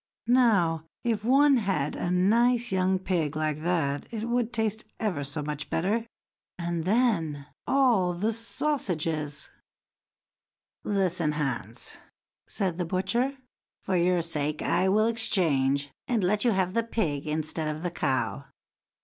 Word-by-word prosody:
Now, 205 -10 +3 0.2
if 225 -3 0
one 275 +3 +5
had 195 - -1
a - - -2
nice 235 +7 +3
young 190 0 +2
pig 170 -5 -1
like 155 -1 -1
that, 160 -5 0
it 225 -1 -4
would 240 -1 0
taste 220 -2 -1 0.2
ever 185 -10 -1
so 145 +2 -3
much 150 0 -5
better; 215 +7 0 0.5
and 170 -2 -2
then, 185 - +1 0.2
all 240 -10 +3
the 210 +6 -1
sausages!" 170 - -2 1.3
"Listen, 180 -6 +1
Hans!" 135 -7 -3
then - - -22 0.5
said 185 -5 -1
the 175 - 0
butcher; 215 +10 0 0.5
"for 190 - -1
your 175 0 +2
sake 150 -2 -2
I 180 +3 +2
will 215 +3 +4
exchange, 145 -11 +1 0.2
and 235 -6 +1
let 205 +3 +2
you 245 - +4
have 190 -4 +1
the 230 - +2
pig 160 -11 -2
instead 155 +1 -1
of 155 +2 -4
the 175 - -1
cow." 130 -3 -1
180 Hz, 140 wpm, -27 LUFS, 155-225 Hz, 1.3 s, one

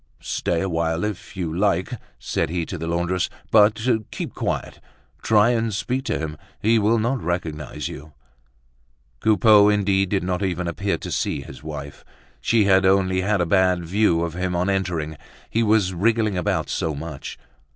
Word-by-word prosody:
"Stay 85 - -1
a 95 - -1
while 80 0 -1
if 105 -2 -5
you 85 -3 -3
like," 95 +2 +1 0.2
said - - -2
he 85 0 -2
to 90 - -6
the 80 - -4
laundress; 85 +2 0 0.2
"but 105 0 +5 0.3
keep - - -5
quiet. - - -3 0.4
Try 110 +2 +4
and 115 -2 0
speak 125 +6 -2
to 115 - -1
him, 80 -1 -5 0.2
he 115 +2 +3
will 110 +2 +3
not 120 +4 0
recognise 80 -4 -3
you." 75 +2 -9 1.1
Coupeau 105 - +5
indeed 100 -2 +2
did 95 -2 0
not 90 0 -1
even 90 -2 -1
appear 100 +4 -1
to - - -7
see - - -1
his - - -11
wife. 70 -3 -8 0.4
She 115 -2 +3
had 95 -1 +4
only 95 -1 +3
had 100 0 +1
a - - +2
bad 90 -1 +2
view 90 -2 +2
of 85 -2 -3
him 90 0 -2
on 90 +3 +1
entering, 85 -5 -2 0.3
he 115 - +1
was 105 -4 +2
wriggling 110 +2 +1
about 90 - 0
so 80 -2 -2
much. 75 -1 -7
95 Hz, 170 wpm, -23 LUFS, 85-105 Hz, 1.1 s, but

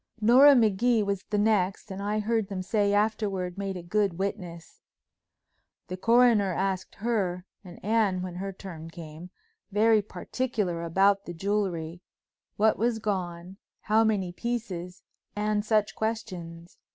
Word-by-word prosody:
Nora 260 +6 +7
Magee 225 0 +3
was 200 -1 -2
the 210 - 0
next, 205 -1 +1
and 190 +1 -5
I 205 +1 -1
heard 220 0 0
them 190 -2 -4
say 200 +1 +1
afterward 205 -4 0
made 195 -1 -4
a 175 - -8
good 195 0 0
witness. 180 -4 -5 1.1
The 185 - -3
coroner 230 -1 +4
asked 190 0 -2
her—and 190 -5 -4
Anne 210 -4 +1
when 185 -1 -5
her 195 +1 -4
turn 170 -4 -9
came—very 210 - -2
particular 210 -5 -3
about 195 +4 +2
the 175 - -7
jewelry, 180 -3 -2 0.6
what 215 +1 +3
was 235 +1 +1
gone, 185 -3 -4 0.2
how 220 +1 +3
many 200 -5 0
pieces 190 -6 -5 0.3
and 210 0 0
such 215 -1 +1
questions. 175 -7 -5
200 Hz, 130 wpm, -27 LUFS, 180-220 Hz, 1.1 s, Nora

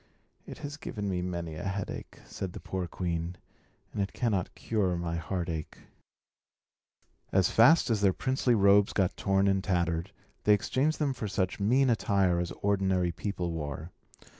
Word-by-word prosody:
"It - - -8
has 145 +1 -6
given 105 -8 -5
me 90 -2 -1
many 85 -3 -4
a 80 - -6
headache," 100 0 -5
said 95 -2 -6
the - - -7
poor 95 -2 -4
queen, 85 0 -3 0.6
"and - - -1
it 100 - -2
cannot 105 -7 -1
cure 95 -6 0
my 85 -1 -2
heartache." 85 -2 -4 1.5
As 95 -3 +3
fast 135 +3 +6
as 110 -2 +1
their 100 -2 +5
princely 130 +3 +1
robes 100 0 +5
got 95 -3 +1
torn 95 0 +2
and 95 -1 +2
tattered, 85 -1 0 0.3
they 105 - +7
exchanged 135 +9 0
them 145 -3 0
for 115 -4 -4
such 95 -1 -1
mean 125 +7 +3
attire 100 -6 +2
as 85 -1 -1
ordinary 95 -3 +2
people 90 0 -3
wore. 75 +1 -5
95 Hz, 160 wpm, -29 LUFS, 85-105 Hz, 1.5 s, they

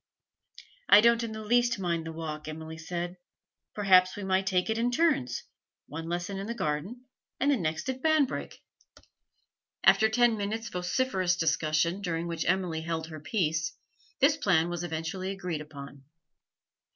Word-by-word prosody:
'I 205 - +9
don't 235 +1 +4
in 230 - -4
the 220 0 -6
least 240 +1 +2
mind 170 -4 -2
the - - -4
walk,' 155 -2 -6
Emily 160 +1 -7
said. 175 +2 -4 0.6
'Perhaps 185 -3 +5
we 205 - -6
might 190 0 +1
take 185 -2 +1
it 220 0 -1
in 240 +1 +2
turns, 285 - +1 0.4
one 160 +3 -7
lesson 175 +3 -3
in 200 - -5
the 235 - -3
garden 190 +8 -3 0.3
and 285 +2 +3
the - - +4
next 160 -5 -2
at 260 0 -3
Banbrigg.' 315 -3 +1 1.3
After 220 - +6
ten 235 0 +3
minutes' 220 +3 -3
vociferous 180 0 0
discussion, 165 +2 +1
during 170 -3 -2
which 170 -1 -3
Emily 180 -3 0
held 160 0 -3
her 155 -1 -8
peace, 160 -2 -1 0.4
this 290 +2 +4
plan 175 - +2
was 175 0 -3
eventually 175 +3 -3
agreed 180 -5 -4
upon. 140 -2 -10
180 Hz, 155 wpm, -29 LUFS, 160-220 Hz, 1.3 s, I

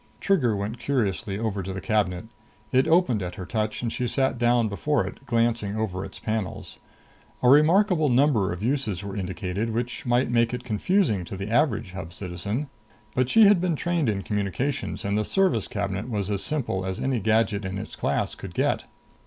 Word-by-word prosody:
Trigger 140 - +2
went 100 +4 -4
curiously 105 -6 -1
over 105 -2 -2
to 95 +1 -5
the 95 - -4
cabinet. 100 -4 0 0.5
It 130 +1 +3
opened 160 - +3
at 90 -1 -4
her 90 - -6
touch 110 +3 -2
and 115 - -2
she 125 - -1
sat 130 -1 0
down 120 -1 +3
before 145 +9 0
it, - - -8
glancing 115 -3 +1
over 95 -4 -2
its 95 - -8
panels. 110 -4 -4 0.6
A 125 - +6
remarkable 160 +3 +5
number 125 - +3
of 90 +3 -5
uses 115 -8 -1
were 100 -1 -6
indicated, 95 +2 -3
which 120 +1 -3
might 120 +1 +2
make 115 0 +2
it 125 - -7
confusing 115 - +1
to 95 - -7
the 100 +3 -5
average 120 -7 +1
Hub 90 -3 -7
citizen. 100 - -4 0.5
But 125 -1 +1
she 225 - +6
had 200 -3 +5
been 180 -3 +1
trained 170 -4 0
in 100 -2 -1
communications, 105 +8 -2
and 100 0 0
the 105 - +1
service 160 - +1
cabinet 100 +2 -3
was 105 -3 -2
as 100 -1 -1
simple 130 -11 -2
as 95 0 -3
any 130 -2 0
gadget 110 -1 +1
in 95 0 -4
its 105 +3 -7
class - - -1
could - - -9
get. - - +1
110 Hz, 190 wpm, -25 LUFS, 100-130 Hz, 0.6 s, A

